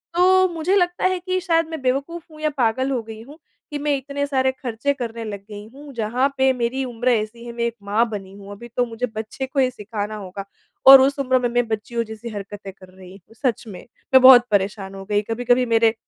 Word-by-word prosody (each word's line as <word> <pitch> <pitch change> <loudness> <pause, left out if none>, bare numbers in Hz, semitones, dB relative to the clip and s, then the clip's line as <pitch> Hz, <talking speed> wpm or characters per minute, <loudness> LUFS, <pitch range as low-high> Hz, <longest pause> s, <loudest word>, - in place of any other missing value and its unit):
तो 375 +1 +5
मुझे 330 +4 0
लगता 355 -2 +1
है 370 -1 +1
कि 370 +1 -2
शायद 330 -2 +1
मैं 320 -4 -6
बेवकूफ़ 280 +6 -2
हूँ 310 - -14
या 305 - +1
पागल 260 +2 +1
हो 255 -3 -1
गई 220 0 -10
हूँ 285 +6 -13 0.3
कि 295 - -3
मैं 290 0 0
इतने 280 +1 -4
सारे 265 -2 +1
ख़र्चे 260 +1 -3
करने 235 -4 -6
लग 205 -2 -5
गई 205 0 -8
हूँ। 285 0 -12
जहाँ 235 +4 0
पे 265 0 +4
मेरी 250 +2 -2
उम्र 245 0 -2
ऐसी 235 0 -1
है 240 - -6
मैं 235 - -3
एक 235 -1 -2
माँ 210 +4 +1
बनी 195 -3 -7
हूँ 200 0 -11
अभी 205 +4 -10
तो 245 - +3
मुझे 230 +1 -3
बच्चे 220 +5 -5
को 265 +1 -3
ये 255 - +3
सिखाना 210 -1 -5
होगा 195 -1 -7 0.4
और 270 0 +11
उस 275 +2 +2
उम्र 260 -1 +2
में 245 - 0
मैं 245 0 0
बच्चियों 225 +2 -3
जैसी 220 +1 -8
हरकतें 200 -1 -8
कर 185 -1 -16
रही 185 -1 -14
हूँ। 200 +4 -23
सच 240 -2 -1
में 195 -4 -9 0.3
मैं 260 - +8
बहुत 255 -2 +9
परेशान 195 -1 -1
हो 195 - -8
गई। 205 +1 +1
कभी-कभी 245 +2 +2
मेरे 225 -1 +3
240 Hz, 230 wpm, -21 LUFS, 215-275 Hz, 0.4 s, और